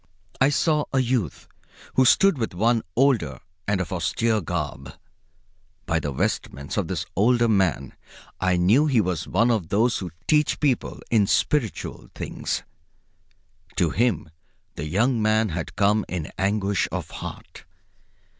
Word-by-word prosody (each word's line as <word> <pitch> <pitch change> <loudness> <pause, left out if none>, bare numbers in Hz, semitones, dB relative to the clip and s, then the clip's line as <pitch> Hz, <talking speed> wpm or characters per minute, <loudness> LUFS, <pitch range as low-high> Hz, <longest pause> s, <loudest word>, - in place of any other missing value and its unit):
I 135 - +6
saw 150 +1 +1
a 135 - 0
youth 120 - -1 0.5
who 130 - +4
stood 195 +3 +5
with 110 -6 -3
one 115 +4 +2
older 115 - +2 0.3
and 100 -1 +1
of 95 0 -3
austere 110 +5 0
garb. 75 -6 -4 0.9
By 80 -1 +1
the 75 - -3
vestments 70 +1 -2
of - - 0
this - - -3
older 120 +4 +3
man 95 - +1 0.5
I 95 -1 +2
knew 110 +13 +4
he 130 -6 +3
was 90 -4 -1
of 115 -7 +2
those 115 +4 +2
who 90 - -5 0.2
teach 150 -1 +2
people 140 -5 0
in 105 -4 +4
spiritual 120 0 -1
things. - - -3 1.1
To 85 -3 +1
him 120 +3 0 0.4
the 75 - -5
young 110 - +1
man 110 0 +2
had 85 0 -5
come 105 +2 +3
in 85 -5 -4
anguish 100 0 0
of - - -4
heart. - - -9
105 Hz, 140 wpm, -24 LUFS, 90-120 Hz, 1.1 s, I